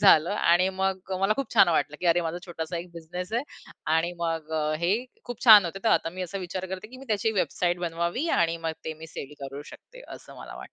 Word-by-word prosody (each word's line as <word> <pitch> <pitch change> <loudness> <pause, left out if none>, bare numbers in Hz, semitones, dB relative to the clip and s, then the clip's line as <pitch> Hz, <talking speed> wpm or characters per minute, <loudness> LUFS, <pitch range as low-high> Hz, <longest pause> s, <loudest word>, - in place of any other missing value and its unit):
झालं. 175 -5 +6
आणि 185 -2 +3
मग 190 0 -2
मला 195 +2 +3
खूप 275 -2 -3
छान 195 -5 +7
वाटलं 150 -2 +1
की 180 - -1
"अरे 170 +1 +4
माझा 165 +1 -3
छोटासा 170 0 -5
एक 175 +1 -8
बिझनेस 175 +4 -7
आहे 240 +3 +1 0.5
आणि 170 +2 0
मग 165 -2 -2
अ, 155 -1 0
हे 175 +3 +3 0.3
खूप 245 -1 -7
छान 215 -5 +10
होते, 175 +3 -4
तर - - +4
आता 165 - +2
मी 185 +1 -5
असा 195 +2 -4
विचार 185 +1 -4
करते 190 +3 -6
की 255 - -12
मी 270 - -11
त्याची 215 +1 +1
वेबसाईट 180 -3 0
बनवावी 170 - -1
आणि 165 0 +2
मग 160 - 0
ते 160 - -4
मी 160 +1 -10
सेल 150 -2 -8
करू 140 +1 -6
शकते" - - -14
असं - - -13
मला - - -9
वाटतं. - - -11
175 Hz, 235 wpm, -27 LUFS, 165-195 Hz, 0.5 s, छान